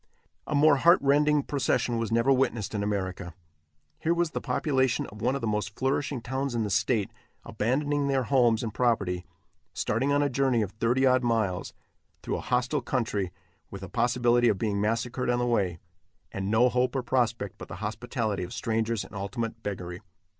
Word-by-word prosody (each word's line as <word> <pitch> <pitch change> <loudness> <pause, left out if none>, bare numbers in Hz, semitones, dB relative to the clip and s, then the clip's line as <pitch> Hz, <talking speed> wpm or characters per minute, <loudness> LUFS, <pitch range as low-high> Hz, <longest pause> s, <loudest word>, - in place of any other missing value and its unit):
A 150 - -1
more 145 0 +5
heart 170 +6 +6
rending 145 +1 +3
procession 125 -4 0
was 115 -1 -2
never 115 +4 +3
witnessed 120 -6 0
in 105 - -1
America. 95 -4 -3 0.6
Here 170 +2 +1
was 170 -2 0
the - - -3
population 130 -1 0
of 105 +1 -11
one 125 +3 +1
of 140 - -3
the - - -2
most 105 -1 -2
flourishing 135 0 -1
towns 130 +1 -3
in 115 - 0
the 105 - -3
state 110 0 +1 0.3
abandoning 145 +5 0
their 135 -2 +1
homes 120 -3 +3
and 110 -3 -4
property, 100 -8 0 0.5
starting 130 +6 0
on 145 0 +3
a - - +2
journey 130 -3 +1
of 100 - -5
thirty 120 +5 +1
odd 130 -1 +4
miles, 110 -6 -1 0.5
through - - -2
a - - -5
hostile 125 0 0
country, 105 -7 -1 0.4
with 95 -1 -8
a 95 - -7
possibility 120 +1 +2
of 105 - +1
being 100 -1 -1
massacred 115 +4 -1
on 120 - +2
the 120 - 0
way, 100 -8 0 0.5
and 95 0 -3
no 110 +4 +4
hope 125 +2 0
or 130 - 0
prospect 120 -6 -1
but - - -8
the 85 - -7
hospitality 110 +1 -3
of 90 - -5
strangers 115 -2 -1
and - - -14
ultimate 110 +3 -4
beggary. 90 -3 -5
120 Hz, 185 wpm, -27 LUFS, 105-130 Hz, 0.6 s, heart